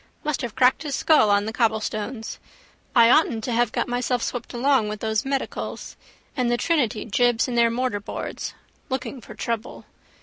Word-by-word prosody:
Must 300 -2 -1
have 240 -3 -5
cracked 255 0 +4
his 290 -3 -3
skull 305 -9 +4
on 205 0 +3
the 220 - -4
cobblestones. 220 0 -2 0.6
I 235 -2 +7
oughtn't 240 -8 +3
to 245 - -2
have 235 -1 +2
got - - -1
myself 245 0 -1
swept 245 - -4
along 245 -3 +2
with 210 0 -5
those 220 0 -1
medicals. 270 0 -4 0.4
And 250 -3 +1
the 240 - +2
Trinity 250 -9 0
jibs 240 +1 +2
in 250 - -3
their 235 -1 +4
mortarboards. 230 -4 -3 0.4
Looking 260 0 -4
for - - -11
trouble. 230 0 -4
240 Hz, 170 wpm, -24 LUFS, 220-255 Hz, 0.6 s, I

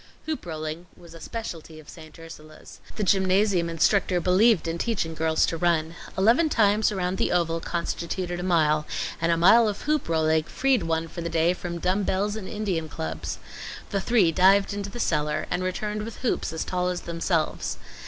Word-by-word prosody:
Hoop 310 - -4
rolling 155 +1 -5
was 170 -1 -14
a 165 - -12
speciality 165 -7 -7
of 155 - -15
St. 155 -2 -13
Ursula's. 155 -2 -13 0.2
The 215 - -2
gymnasium 190 -2 +2
instructor 180 +2 +2
believed 185 +2 +3
in 165 +1 -3
teaching 190 -8 -1
girls 160 0 +1
to 165 - -3
run. 165 -1 +1 0.2
Eleven 235 - +4
times 215 -3 +3
around 185 -2 -2
the - - +1
oval 165 -1 +1
constituted 175 +1 -3
a - - -3
mile, 155 -4 +2 0.3
and 165 0 +2
a 165 - +2
mile 225 +7 +6
of 205 - -3
hoop 300 - 0
rolling 160 -1 +2
freed 270 +4 +1
one 165 0 -1
for 170 - -7
the 170 - -3
day 165 +1 +2
from 175 -1 -6
dumb 185 +4 0
bells 200 +2 -1
and 210 -4 -6
Indian 190 -7 -2
clubs. 80 - -5 0.5
The 200 - 0
three 200 -6 +3
dived 195 +4 +4
into 200 -1 -4
the 240 - -8
cellar, 150 -5 0
and 180 - 0
returned 210 +3 -3
with 220 +1 -7
hoops 240 - -1
as 160 - -3
tall 180 -1 -1
as 180 -1 -2
themselves. 165 -1 -2
175 Hz, 185 wpm, -25 LUFS, 165-200 Hz, 0.5 s, mile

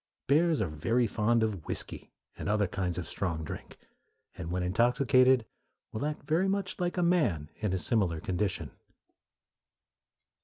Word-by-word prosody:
Bears 155 +1 +3
are - - +2
very 115 +11 +1
fond 115 +1 +2
of 100 -7 -2
whiskey - - -3 0.2
and - - -4
other 105 -1 +2
kinds 90 -2 -2
of 90 -3 -4
strong 85 -2 -2
drink, 75 - -8 0.6
and 80 - -6
when 90 +1 -1
intoxicated 125 +5 +4 0.5
will 110 +7 -2
act 150 - -5
very 170 +5 +1
much 195 -1 -2
like 175 0 -1
a 180 - +2
man 120 - +1
in 105 -3 -1
a 95 - +1
similar 90 -5 0
condition. 95 +3 -2
110 Hz, 150 wpm, -30 LUFS, 90-140 Hz, 0.6 s, intoxicated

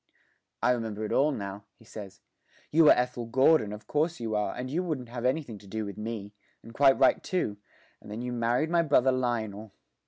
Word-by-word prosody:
'I - - +4
remember 110 -3 -2
it - - -5
all 150 +3 +3
now,' 100 -4 -6
he 115 - -20
says. 105 -3 -10 0.5
'You 155 0 +6
are - - +10
Ethel 125 -1 -2
Gordon, 130 -2 +4
of 105 +2 -8
course 160 +3 0
you 115 -2 -3
are, 105 -2 -1
and 125 - -4
you 155 +7 -1
wouldn't 150 -9 -4
have 120 0 -5
anything 130 -5 -1
to 100 - -16
do 110 +2 -4
with 100 - -7
me 105 -2 -6 0.3
and 115 - -12
quite 135 +1 +5
right 130 - +4
too 175 - -2 0.4
and - - -13
then 110 +3 -5
you 125 0 -3
married 120 +6 0
my 170 -1 +4
brother 135 -5 +3
Lionel. 110 -5 -2
120 Hz, 210 wpm, -28 LUFS, 105-135 Hz, 0.5 s, are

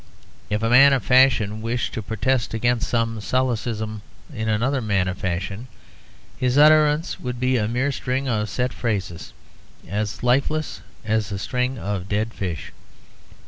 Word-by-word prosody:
If 105 +1 -1
a 115 - +1
man 135 +3 +7
of 135 - +1
fashion 120 -5 +4
wished 115 +2 -2
to 110 - -3
protest 115 +3 -1
against 120 +2 0
some 115 -2 -1
solecism 110 -3 -2 0.3
in 110 -3 -3
another 125 +5 +1
man 100 -4 0
of 90 - -4
fashion, 95 +6 -3 0.7
his 125 +1 +1
utterance 155 +2 +4
would 125 -1 -5
be 130 +1 +1
a 105 -2 0
mere 125 +5 0
string 130 +1 -2
of 110 -3 -1
set 125 0 -2
phrases, 95 -7 -3 0.6
as 105 +2 -3
lifeless 140 +5 0 0.2
as 110 -1 0
a 100 - -3
string 125 +5 -2
of 100 -3 -4
dead 110 +3 -1
fish. 90 -5 -5
115 Hz, 150 wpm, -22 LUFS, 105-130 Hz, 0.7 s, man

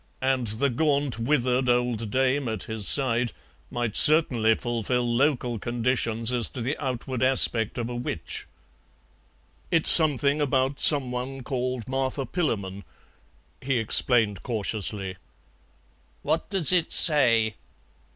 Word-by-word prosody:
And 130 -2 -1
the 120 +6 -2
gaunt, 140 -3 -2
withered 125 0 -1
old 120 -3 -2
dame 130 +3 -1
at 110 -3 -5
his 110 -3 +1
side 120 -3 +2 0.4
might 120 -3 -5
certainly 125 -8 +3
fulfil 120 +1 -3
local 125 -4 -1
conditions 115 0 -2
as 120 -2 +1
to 125 - -9
the 130 +6 -3
outward 130 -1 -5
aspect 125 -4 +4
of 120 -1 -4
a 120 - -7
witch. 120 -9 -7 1.2
"It's 165 -2 +5
something 145 -2 +5
about 135 0 -2
some 140 -5 +5
one 130 +2 -7
called 125 -3 -5
Martha 135 +1 -4
Pillamon," 100 - -5 0.8
he 135 -1 -2
explained 115 -2 +2
cautiously. 105 -4 -5 1.1
"What - - -3
does 185 -6 +2
it 180 -3 0
say?" 115 -8 +3
125 Hz, 120 wpm, -23 LUFS, 115-135 Hz, 1.2 s, It's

